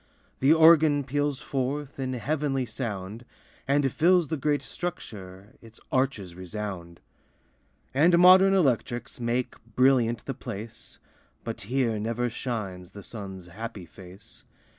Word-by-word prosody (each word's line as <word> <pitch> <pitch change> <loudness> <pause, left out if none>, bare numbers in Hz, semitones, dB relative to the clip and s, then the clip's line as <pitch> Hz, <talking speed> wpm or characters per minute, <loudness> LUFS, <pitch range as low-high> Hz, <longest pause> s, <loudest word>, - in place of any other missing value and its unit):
The 135 +3 +4
organ 160 -3 +6
peals 145 +1 -1
forth 140 +1 -3
In 130 -1 -2
heavenly 135 +1 -1
sound, 110 -2 -5 0.4
And 140 -1 +2
fills 175 +1 +3
the 160 - -1
great 145 0 0
structure, 100 - -7
Its 115 -1 -15
arches 130 -9 -1
resound. 90 -2 -7 0.9
And 165 +6 +5
modern 185 +2 +7
electrics 125 - 0
Make 120 +1 -1 0.2
brilliant 125 -3 +3
the 135 - -3
place, 115 -2 -9 0.5
But 115 - -5
here 120 -4 0
never 115 +3 -2
shines 100 -7 -5
The 100 - -10
sun's 95 -5 -8
happy 105 +1 -8
face. 95 +4 -13
125 Hz, 120 wpm, -27 LUFS, 105-145 Hz, 0.9 s, modern